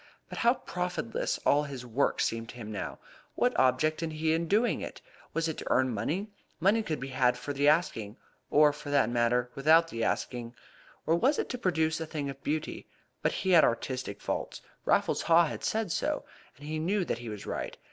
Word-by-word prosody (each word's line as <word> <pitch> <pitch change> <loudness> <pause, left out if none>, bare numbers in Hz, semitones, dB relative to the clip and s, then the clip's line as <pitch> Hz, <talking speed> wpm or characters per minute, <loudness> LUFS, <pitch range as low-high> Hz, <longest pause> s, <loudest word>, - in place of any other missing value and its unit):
But - - -6
how 240 +1 +4
profitless 180 - -3
all 145 - +5
his 135 -3 -7
work 125 +4 +1
seemed 115 0 -1
to - - -9
him 110 -3 -7
now! 105 - -4 0.4
What 250 0 +2
object 130 +5 +2
had 160 -1 -3
he 155 +1 +1
in 165 +1 0
doing 215 +7 +2
it? - - -7 0.3
Was 165 0 0
it 160 - -4
to - - -6
earn 130 -1 +3
money? 165 - -2 0.3
Money 200 +6 +3
could 165 -8 -3
be 135 - -5
had 125 -2 +2
for 145 - -5
the 140 +1 +2
asking, 125 - +1 0.3
or, 150 0 +5
for 150 0 -9
that 140 -4 +3
matter, 120 +1 +1
without 160 +4 +4
the 115 0 -3
asking. 120 0 -2 0.5
Or 160 - +2
was 265 - +2
it - - -2
to 250 - -3
produce 165 -5 +1
a 160 - -3
thing 145 -3 -3
of 135 - -14
beauty? 155 +1 -3 0.3
But - - +2
he 190 - -1
had 170 -3 +7
artistic 125 -2 -1
faults. - - -4 0.2
Raffles - - +2
Haw 170 0 +5
had 150 - -5
said 220 -5 -1
so, - - -1 0.3
and 145 - -12
he 155 +1 -3
knew 185 +4 0
that 120 - -2
he 120 -1 -7
was 105 -2 -7
right. - - -4
150 Hz, 210 wpm, -29 LUFS, 125-170 Hz, 0.5 s, had